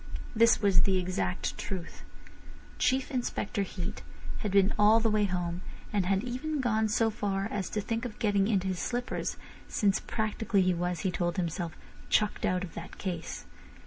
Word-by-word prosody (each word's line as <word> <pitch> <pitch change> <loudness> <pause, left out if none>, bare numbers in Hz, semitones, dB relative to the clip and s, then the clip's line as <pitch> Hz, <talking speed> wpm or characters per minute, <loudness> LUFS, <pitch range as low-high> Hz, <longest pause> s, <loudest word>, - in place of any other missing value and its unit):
This 230 -1 +5
was 195 -3 +5
the 190 +1 +3
exact 185 0 -1
truth. 185 -3 -5 0.8
Chief 260 +2 +2
Inspector 240 -5 -1
Heat 185 -2 -4 0.4
had 210 - -2
been 195 +1 +4
all 215 +2 +7
the 225 -1 +2
way 210 -1 +3
home, 175 -2 -2 0.3
and 195 -3 +1
had 195 +1 +2
even 260 +5 -2
gone 220 -4 +2
so 225 +1 +2
far 200 -2 -1
as 200 -2 -2
to 210 - -1
think 225 +3 -2
of 245 -4 -5
getting 205 -2 +2
into 195 -4 +1
his 185 -1 -1
slippers, 245 0 -2 0.3
since 200 -2 +2
practically 215 -2 0
he 185 0 +3
was, 175 -1 -1
he 190 - 0
told 175 -1 -1
himself, 170 -1 -2 0.4
chucked 210 -1 +2
out 180 0 +1
of 175 - -7
that - - -8
case. 175 -4 -4
200 Hz, 175 wpm, -30 LUFS, 185-220 Hz, 0.8 s, all